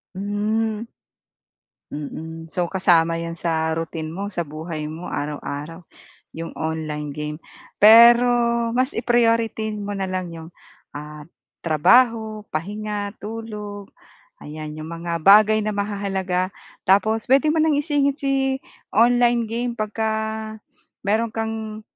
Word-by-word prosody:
Hmm. 210 +2 -1 1.1
Mm. 160 +2 -7
So, 175 +2 -2
kasama 170 -3 +3
'yan 165 0 -4
sa 160 -1 -1
routine 165 -1 -5
mo, 200 +3 -4
sa 175 -4 -3
buhay 155 +1 -6
mo, 160 +3 -7
araw-araw, 150 +3 -5 0.5
'yong 165 +1 -7
online 155 -2 -4
game. 150 +1 -5 0.4
Pero 235 +3 +9 0.4
mas 255 +3 0
i-priority 230 -2 +1
mo 205 -1 -5
na 190 - -1
lang 185 -1 -3
'yong, 165 0 -9 0.4
ah, 150 0 -8 0.3
trabaho, 220 - +3
pahinga, 205 +4 -3
tulog, 210 -2 -7 0.5
ayan. 155 0 -8
'Yong 155 - -6
mga 170 0 -4
bagay 210 +5 +6
na 215 - -1
mahahalaga. 195 -2 -2 0.3
Tapos 215 +3 +3
puwede 275 +4 +4
mo 320 - +1
nang 315 -1 +3
isingit 285 -1 0
si 270 -1 0 0.3
online 240 -1 +3
game 240 +1 -2
'pag 215 -2 -3
ka 220 0 -1 0.9
meron 220 +2 0
kang 220 -1 -4
205 Hz, 120 wpm, -22 LUFS, 165-225 Hz, 1.1 s, Pero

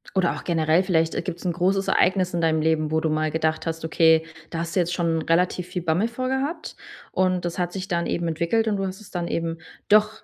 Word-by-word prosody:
Oder 185 -2 +2
auch - - -8
generell 165 +1 +2
vielleicht, 165 -3 +1
äh, - - 0
gibt's 180 0 -6
'n 175 - +1
großes 190 +3 +1
Ereignis 185 -1 +2
in 170 - 0
deinem 160 -1 +2
Leben, 155 -1 +1
wo 160 - +2
du 160 - 0
mal 155 0 0
gedacht 160 0 -1
hast, 160 0 -3
okay, 160 0 +4 0.2
da 165 - -4
hast 170 +1 -4
du - - +3
jetzt 175 0 0
schon 165 -2 0
relativ 180 +1 +1
viel 180 -1 -4
Bammel 175 +6 +1
vor 255 +2 -4
gehabt 275 +6 -3 0.4
und 185 -1 +1
das 175 +1 -3
hat 175 0 -1
sich 190 0 -5
dann 170 -2 -1
eben 170 -1 -1
entwickelt 170 +8 0
und 205 -2 +1
du 195 - -1
hast 190 +2 -6
es 205 - -14
dann 175 -1 -3
eben 165 0 -2 0.3
doch 215 +1 +3
175 Hz, 245 wpm, -24 LUFS, 160-185 Hz, 0.4 s, okay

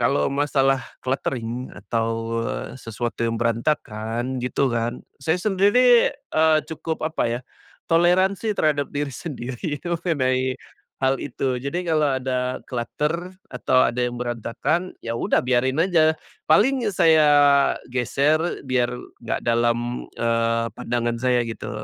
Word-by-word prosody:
kalau 75 - +2
masalah 135 -2 +2 0.2
cluttering 125 -2 -2
atau, 115 0 -2
eee, - - -4
sesuatu 115 +1 -5
yang 115 0 0
berantakan 115 0 -1
gitu 125 +2 0
kan. 120 +1 -2 0.2
Saya 160 +2 +1
sendiri, 215 +6 +4
eee, 160 - +2
cukup 160 0 -4
apa 155 -6 0
ya, 120 +2 -2 0.5
toleransi 185 +5 +2
terhadap 145 -2 +1
diri 145 -1 -3
sendiri 130 0 -5
mengenai 130 -7 0 0.5
hal 135 0 +2
itu. 130 -1 -2
Jadi, 170 +7 -3
kalau 150 -4 +2
ada 130 0 -2
clutter 150 +9 -3 0.2
atau 130 - +3
ada 125 +1 0
yang 125 0 -1
berantakan, 120 - -2
ya 115 - -2
udah 115 - +1
biarin 130 +2 +1
aja, 160 -4 +3 0.3
paling 250 +8 +4
saya 160 -5 +5 0.6
geser 140 +5 +2 0.2
biar 130 -2 +1 0.3
nggak 115 -2 -3
dalam, 120 +1 0
eee, 115 0 +1
pandangan 120 -1 -2
saya 125 -1 +2
gitu, 115 -1 -6
130 Hz, 125 wpm, -23 LUFS, 120-160 Hz, 0.6 s, saya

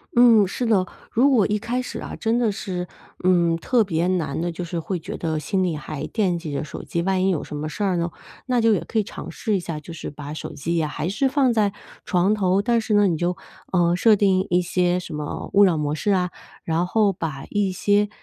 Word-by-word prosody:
嗯， 230 -4 +6
是 245 +6 -3
的， 200 -5 +2 0.2
如 255 +5 +4
果 235 -8 +4
一 210 0 0
开 235 +3 -2
始 - - -6
啊， - - -6
真 230 +1 0
的 230 -3 +2
是， 185 -3 -4 0.4
嗯， 175 -2 +3
特 235 +7 +2
别 170 -3 0
难 170 -5 -1
的， 175 0 -1
就 175 +2 -5
是 170 0 -3
会 180 +3 -3
觉 160 - -7
得 160 -2 -2
心 190 +5 0
里 175 -3 0
还 150 0 -5
惦 185 -6 0
记 165 -3 -6
着 140 - -2
手 155 - -7
机， 170 - -2
万 190 0 +1
一 190 - +3
有 175 -6 0
什 - - -7
么 150 +1 -3
事 155 +7 -4
儿 190 -2 +1
呢， 170 0 0 0.4
那 250 -2 +2
就 225 -1 +4
也 - - +2
可 - - -4
以 215 - +3
尝 - - -8
试 215 - -2
一 - - +1
下， 165 -3 -5
就 160 +3 -10
是 165 - -6
把 145 0 -8
手 155 - -6
机 165 +4 -2
呀 160 -2 +1
还 150 +2 -3
是 265 +9 +1
放 265 -3 +3
在 210 -3 +2 0.3
床 185 +2 +2
头， 190 -2 +2
但 235 0 +2
是 220 -1 0
呢， 205 0 +5
你 170 -3 0
就， 175 +2 -1 0.3
呃， 175 -2 +3
设 215 +4 +5
定 190 -2 +2
一 180 +1 +3
些 180 0 +1
什 175 -3 -8
么 150 -1 -5
勿 200 - +7
扰 180 -5 +4
模 150 -1 -1
式 155 +6 -2
啊， 180 -2 +1 0.3
然 165 +2 0
后 210 0 +2
把 150 -6 -5
一 205 -2 +1
些， 205 +2 +2
185 Hz, 265 characters per minute, -23 LUFS, 165-210 Hz, 0.4 s, 勿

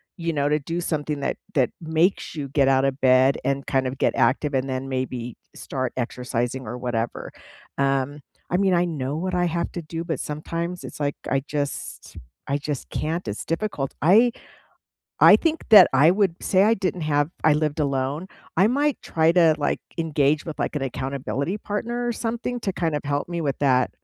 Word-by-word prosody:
you 170 -2 -2
know, 145 -2 0
to 150 +1 +2
do 165 +5 -4
something 150 -3 -2
that 140 - -1 0.2
that 130 -4 +2
makes 160 +4 +1
you 145 -3 -4
get 135 0 +2
out 135 0 +3
of 135 0 -2
bed 130 +1 +5
and 140 0 -1
kind 135 -1 +1
of 130 - -5
get - - +1
active, 135 +4 +2
and 135 +1 0
then 130 +1 -3
maybe 130 -2 -3 0.2
start 130 -2 -3
exercising 125 0 -2
or 120 +3 -5
whatever. 120 -2 -3 0.5
Um, 140 +1 0 0.3
I 180 - 0
mean, 190 -1 +2
I 175 0 +3
know 145 -4 -3
what 185 +2 -2
I 180 0 +2
have 170 0 -2
to 175 - -4
do, 165 +2 -5
but 160 -5 -3
sometimes 170 +4 -4
it's, - - -9
like, 145 -1 -1
I 135 +1 +1
just 145 -1 -5 0.3
I 140 - 0
just 145 -2 -5
can't. 160 -2 -3
It's 105 - -4
difficult. 165 -6 -2
I 220 +10 +5 0.9
I - - +9
think 325 -1 -2
that 205 -5 +10
I 140 +5 +6
would 195 -4 +1
say 190 0 +3
I 225 +2 +4
didn't 185 -4 -2
have 145 0 +1
I 155 - +6
lived 150 0 0
alone. 140 +4 -1 0.3
I 195 +5 +5
might 285 +3 0
try 160 0 +2
to, 170 -3 +5
like, 145 - -1 0.2
engage 150 -2 +1
with, 160 - -6
like, - - -2
an 145 - -2
accountability 135 - -3
partner 235 +4 -3
or 240 - 0
something 235 +2 -3
to 195 - -2
kind 165 -3 -1
of 150 - -2
help 145 +2 -1
me 170 -1 -3
with 140 -3 -2
that. 130 -3 +2
150 Hz, 195 wpm, -24 LUFS, 135-175 Hz, 0.9 s, that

